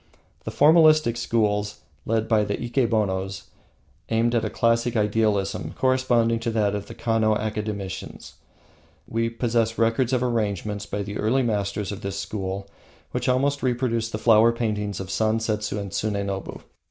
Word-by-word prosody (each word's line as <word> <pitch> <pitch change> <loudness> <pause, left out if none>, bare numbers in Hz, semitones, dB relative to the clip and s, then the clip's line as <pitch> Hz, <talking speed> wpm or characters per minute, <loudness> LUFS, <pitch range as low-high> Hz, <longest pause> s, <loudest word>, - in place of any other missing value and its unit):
The - - -4
Formalistic 155 -4 +5
schools, 105 -3 0 0.3
led 110 0 0
by 110 -2 +3
the 100 0 -2
Ikenobos, 105 -6 -1 0.7
aimed 115 +1 +1
at 115 - +1
a - - -1
classic 115 +1 +1
idealism 105 -2 0
corresponding 130 -3 +2
to 115 - -2
that 105 -3 +1
of 105 -1 -4
the - - -9
Kano 110 -2 +1
academicians. 105 -3 -5 0.7
We 115 +1 -1
possess 115 -1 0
records 115 +2 +1
of 125 -1 +1
arrangements 105 -3 -2
by 100 0 -3
the 100 +1 -6
early 130 +5 +2
masters 105 -3 -1
of 100 +1 -7
the 100 - -3
school 100 0 -4 0.4
which - - -1
almost 140 +2 +1
reproduce 120 -3 0
the 110 - -4
flower 115 +1 +5
paintings 105 -4 -2
of 95 -1 -6
Sansetsu 110 0 0
and 100 -2 -5
Tsunenobu. 100 -1 -3
110 Hz, 145 wpm, -24 LUFS, 105-115 Hz, 0.7 s, Formalistic